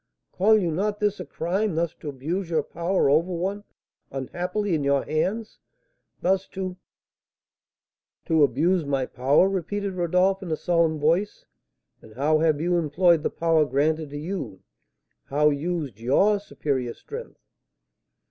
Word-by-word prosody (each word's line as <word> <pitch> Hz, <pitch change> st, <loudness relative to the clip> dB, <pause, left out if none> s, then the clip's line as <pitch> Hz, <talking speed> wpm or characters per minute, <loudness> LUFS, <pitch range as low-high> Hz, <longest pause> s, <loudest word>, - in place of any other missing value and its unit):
Call 215 Hz, +4 st, +4 dB
you 180 Hz, -5 st, 0 dB
not 205 Hz, +5 st, -1 dB
this 205 Hz, -1 st, 0 dB
a 180 Hz, -, -5 dB
crime 190 Hz, +3 st, -1 dB
thus 165 Hz, -1 st, 0 dB
to 150 Hz, -, -6 dB
abuse 165 Hz, +7 st, -3 dB
your 165 Hz, -, +1 dB
power 170 Hz, -1 st, 0 dB
over 160 Hz, +6 st, +3 dB
one 190 Hz, +4 st, -2 dB, 0.5 s
unhappily 180 Hz, -, -3 dB
in 155 Hz, -3 st, 0 dB
your 140 Hz, 0 st, +2 dB
hands? 195 Hz, +9 st, -2 dB, 0.6 s
Thus 190 Hz, +1 st, +1 dB
to 185 Hz, -1 st, -3 dB, 0.8 s
" -, -, -62 dB
"To 160 Hz, -2 st, +2 dB
abuse 160 Hz, +6 st, +3 dB
my 135 Hz, -2 st, -1 dB
power!" 135 Hz, +9 st, +3 dB
repeated 195 Hz, +1 st, -2 dB
Rodolph, 180 Hz, +2 st, +1 dB
in 185 Hz, -, -6 dB
a 160 Hz, -, +1 dB
solemn 170 Hz, -3 st, +1 dB
voice. 170 Hz, +8 st, 0 dB, 0.6 s
"And 110 Hz, -1 st, -16 dB
how 150 Hz, +4 st, +2 dB
have 155 Hz, -2 st, +2 dB
you 175 Hz, +2 st, +1 dB
employed 165 Hz, +1 st, +3 dB
the -, -, 0 dB
power 165 Hz, -2 st, +2 dB
granted 150 Hz, +2 st, 0 dB
to 145 Hz, -, -6 dB
you? 150 Hz, -, -5 dB, 0.6 s
How 150 Hz, +2 st, +3 dB
used 145 Hz, -, -3 dB
your 195 Hz, -, +3 dB
superior 135 Hz, -11 st, -3 dB
strength?" 470 Hz, +3 st, -9 dB
170 Hz, 145 wpm, -25 LUFS, 150-190 Hz, 0.8 s, Call